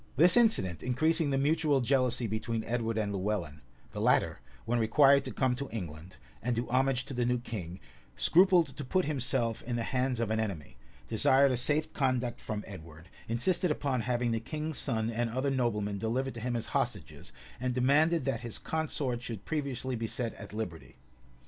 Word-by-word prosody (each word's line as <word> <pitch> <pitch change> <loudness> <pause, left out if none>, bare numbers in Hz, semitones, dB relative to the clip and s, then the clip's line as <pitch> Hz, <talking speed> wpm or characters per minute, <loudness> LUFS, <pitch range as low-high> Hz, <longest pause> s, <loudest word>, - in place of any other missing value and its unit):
248 160 - +7
This 180 - +5
incident 95 - +1
increasing 155 +5 +1
the 135 - +1
mutual 145 0 +2
jealousy 125 -1 +1
between 110 +1 -2
Edward 115 -1 -2
and 105 -2 -1
Lewellyn, 95 -6 -3 0.3
the - - -5
latter, - - +2 0.3
when 120 +1 +1
required 140 +5 +5
to - - -4
come 130 -2 +1
to 140 +3 -5
England, 85 -4 -7 0.2
and 120 +1 -1
do 120 +2 -2
homage 130 0 +2
to 140 - -7
the 125 -1 0
new 125 +1 +1
king, 95 -7 -6 0.4
scrupled 175 -5 +4
to 145 - -5
put 185 +8 0
himself 125 -5 0
in 120 0 -4
the 115 - -1
hands 125 0 -1
of 115 -2 -1
an 110 - +1
enemy, 95 -10 -4 0.3
desired 135 +5 +4
a - - +1
safe 145 +5 +1
conduct 125 -3 0
from 105 -2 -4
Edward, 80 -3 -11 0.2
insisted 175 +10 +1
upon 140 -4 0
having 120 0 0
the 115 - 0
king's 155 +5 -4
son 115 -4 0
and 120 +1 -1
other 130 +4 -1
noblemen 105 -6 -1
delivered 130 +5 -1
to 115 - -7
him 120 +1 -2
as 115 -1 -2
hostages, 120 - -3 0.3
and 125 0 -2
demanded 150 +6 +3
that 135 -5 -1
his 120 -3 -5
consort 145 -6 -2
should 115 -5 -7
previously 135 -4 -2
be 115 -1 -3
set 115 0 -3
at - - -10
liberty. 105 -7 -6
125 Hz, 185 wpm, -30 LUFS, 110-135 Hz, 0.4 s, 248